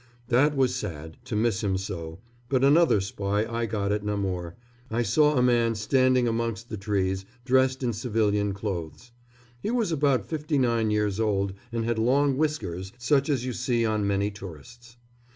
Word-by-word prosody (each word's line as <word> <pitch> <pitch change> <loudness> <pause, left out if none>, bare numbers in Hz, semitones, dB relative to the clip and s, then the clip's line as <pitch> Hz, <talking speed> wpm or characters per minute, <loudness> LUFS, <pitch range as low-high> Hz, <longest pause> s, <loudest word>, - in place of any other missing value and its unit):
That 140 +4 +3
was 130 -2 +3
sad, 80 - -6
to - - -4
miss 110 -1 +1
him 95 -2 +1
so; 90 -3 -6 0.3
but 130 -1 +2
another 150 -3 +5
spy 100 +2 -1
I 115 0 -2
got 100 -2 -1
at 105 0 -1
Namur. 95 -5 -3 0.3
I 115 +2 0
saw 150 +7 +3
a 125 - +4
man 120 -2 +3
standing 130 +3 +2
amongst 115 0 -2
the - - -4
trees, 95 -1 -1 0.2
dressed 130 0 +2
in 120 -2 0
civilian 105 -2 0
clothes. 100 - -5 0.5
He - - -2
was 230 -6 0
about 140 -4 +2
fifty 150 -2 -2
nine 115 -4 +2
years 105 -1 0
old 100 -3 0 0.2
and 115 -1 -2
had 115 -1 0
long 135 +4 +3
whiskers, 95 - -2
such 135 +4 +1
as 130 -4 0
you 130 - -2
see 120 -1 0
on 110 -2 0
many 100 +1 0
tourists. 105 - -12
115 Hz, 170 wpm, -26 LUFS, 100-130 Hz, 0.5 s, another